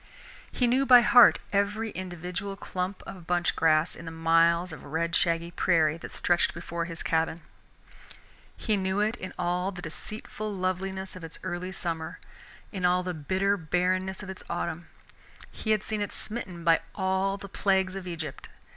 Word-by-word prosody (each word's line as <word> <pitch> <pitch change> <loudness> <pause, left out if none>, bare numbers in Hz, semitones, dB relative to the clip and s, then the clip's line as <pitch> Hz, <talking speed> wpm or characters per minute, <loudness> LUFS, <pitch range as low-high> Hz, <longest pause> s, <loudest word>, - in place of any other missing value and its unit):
He 250 - +1
knew 250 +3 +3
by 250 -2 +8
heart 240 0 +8 0.2
every 205 +2 0
individual 180 +2 -5
clump 185 0 -4
of 175 -4 -10
bunch 175 0 +1
grass 155 0 +3
in 170 - -10
the 165 - -6
miles 165 +2 +3
of - - -9
red 165 +3 -1
shaggy 170 -1 +1
prairie 165 -3 +2
that - - -9
stretched 175 -2 +1
before 170 0 -4
his 165 -1 -6
cabin. 165 0 0 1.2
He 215 -3 0
knew 190 +1 0
it 215 +2 +1
in 185 - -6
all 180 +1 0
the 180 -2 -9
deceitful 215 +5 -5
loveliness 190 0 -3
of 185 - -9
its 165 0 -7
early 185 0 -3
summer, 165 -4 -3 0.5
in 190 -3 -5
all 180 0 +3
the 180 0 -3
bitter 190 +6 0
barrenness 185 +3 0
of 195 - -8
its 190 - -10
autumn. 170 -1 -3 0.6
He 220 - -6
had 215 -2 +3
seen 215 -1 -3
it 205 - -2
smitten 190 -6 -4
by 165 -1 +5 0.2
all 190 +1 0
the 200 0 -9
plagues 190 -1 +1
of 190 -1 -6
Egypt. 160 -5 -6
180 Hz, 170 wpm, -28 LUFS, 170-195 Hz, 1.2 s, by